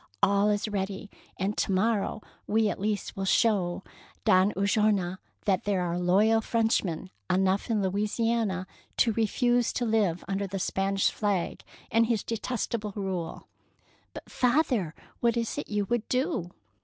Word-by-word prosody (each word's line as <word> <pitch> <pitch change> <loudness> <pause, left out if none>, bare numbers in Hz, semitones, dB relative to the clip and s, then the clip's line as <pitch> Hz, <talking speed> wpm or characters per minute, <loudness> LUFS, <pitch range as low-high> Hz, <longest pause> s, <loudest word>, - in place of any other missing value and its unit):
All 200 +1 +4
is 205 +1 0
ready, 200 0 -4 0.3
and 200 +2 -1
to - - 0
morrow 210 +2 0 0.2
we 220 0 +2
at - - -4
least 210 +1 -2
will 195 - -3
show 190 -3 +2 0.4
Don 185 +2 +5
Ulloa 200 -2 +1 0.3
that 190 -3 +1
there 200 -3 +1
are 175 0 -1
loyal 205 +5 +4
Frenchmen 210 -7 0 0.2
enough 190 +3 +1
in 215 -3 +1
Louisiana 210 0 0 0.3
to 230 - +3
refuse 240 +2 +2
to 245 - -1
live 210 -7 +1
under 195 +1 -1
the 195 +1 -4
Spanish 195 +1 +1
flag 200 -5 -1 0.3
and 230 +1 +4
his 225 -3 0
detestable 225 -2 -3
rule." 190 -5 -4 0.3
" - - -36
But, - - -9
father, 245 - +1 0.2
what 235 0 +2
is 230 -1 -1
it - - -6
you 205 -1 0
would 240 +2 -2
do?" 255 - 0
205 Hz, 150 wpm, -28 LUFS, 190-225 Hz, 0.4 s, Don